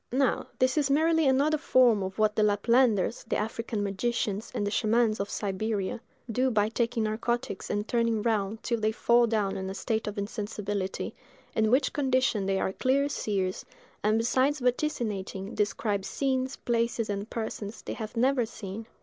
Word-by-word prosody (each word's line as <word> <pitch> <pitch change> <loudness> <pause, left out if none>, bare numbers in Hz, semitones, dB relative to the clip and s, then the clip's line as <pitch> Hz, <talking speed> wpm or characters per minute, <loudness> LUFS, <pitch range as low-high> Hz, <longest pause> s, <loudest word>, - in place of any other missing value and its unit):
Now 260 0 +1
this 255 +4 +2
is 285 -2 +1
merely 320 +2 +3
another 285 +4 +3
form 245 -8 +4
of 190 0 -4
what 215 -1 +2
the - - +2
Laplanders, 215 +1 +3
the - - 0
African 220 0 -2
magicians, 205 +1 -2
and 205 - 0
the 205 - -1
Schaamans 220 0 +2
of 200 0 -2
Siberia, 205 +1 -2 0.3
do 255 +4 +2
by 215 -3 +2
taking 230 0 0
narcotics 235 0 -2
and 205 +1 -1
turning 230 -3 +1
round 215 -1 -1
till 235 -2 0
they 215 0 +1
fall 235 +2 +3
down 210 -3 0
in 190 0 -4
a 190 - -5
state 220 0 -2
of 210 +1 -4
insensibility, 205 -2 -3 0.4
in 220 -1 +3
which 260 +5 +3
condition 255 -7 +1
they 195 0 +1
are 190 - -1
clear 275 +5 +1
seers, 195 -8 -2 0.4
and 215 +1 +3
besides 260 +5 +2
vaticinating, 235 -7 -2
describe 205 -1 0
scenes, 260 +3 -1
places, 235 -1 0
and 205 +1 -3
persons, 220 -1 -5
they - - -4
have 220 +1 -6
never 255 +1 +3
seen. 220 0 -7
225 Hz, 165 wpm, -28 LUFS, 205-250 Hz, 0.4 s, form